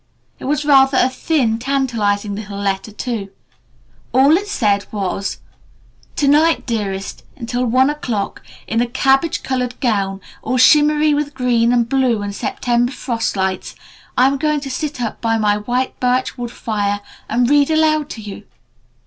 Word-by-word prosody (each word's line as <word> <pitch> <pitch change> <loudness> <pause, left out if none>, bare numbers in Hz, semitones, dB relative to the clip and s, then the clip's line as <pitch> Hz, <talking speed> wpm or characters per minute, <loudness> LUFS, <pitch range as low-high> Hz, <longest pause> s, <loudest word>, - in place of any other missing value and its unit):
It - - -8
was 295 +2 -1
rather 270 -2 +5
a 255 - +3
thin, 255 -6 0
tantalizing 230 -6 0
little 200 -1 -6
letter, 195 +1 -2
too. 215 -2 -4 0.8
All 270 +5 +5
it 405 +4 -1
said 205 - 0
was, 195 -1 -3 0.8
"To 285 - +1
night, 310 +3 +3
Dearest, 200 -5 -3
until 245 -1 -2
one 255 +3 +4
o'clock, 245 -9 -3 0.2
in 225 +1 0
a 245 - 0
cabbage 270 +5 +1
colored 250 -1 -2
gown 195 -5 0 0.2
all 255 - -1
shimmery 300 +3 +5
with 290 0 -2
green 240 -2 +2
and 240 -2 +2
blue 250 -5 +1
and 200 0 -4
September 240 +4 -1
frost 235 -6 -3
lights, 190 0 -2 0.4
I'm 270 +2 +4
going 300 +1 0
to 275 -1 -6
sit 300 +1 -4
up 225 - -4
by 225 -1 +1
my 210 -1 +2
white 245 +5 -2
birch 250 +1 0
wood 245 -2 -5
fire 205 -3 -2 0.3
and 245 0 +2
read 285 +1 +4
aloud 310 -1 +2
to 225 - -7
you. 205 -2 -9
245 Hz, 155 wpm, -18 LUFS, 210-275 Hz, 0.8 s, rather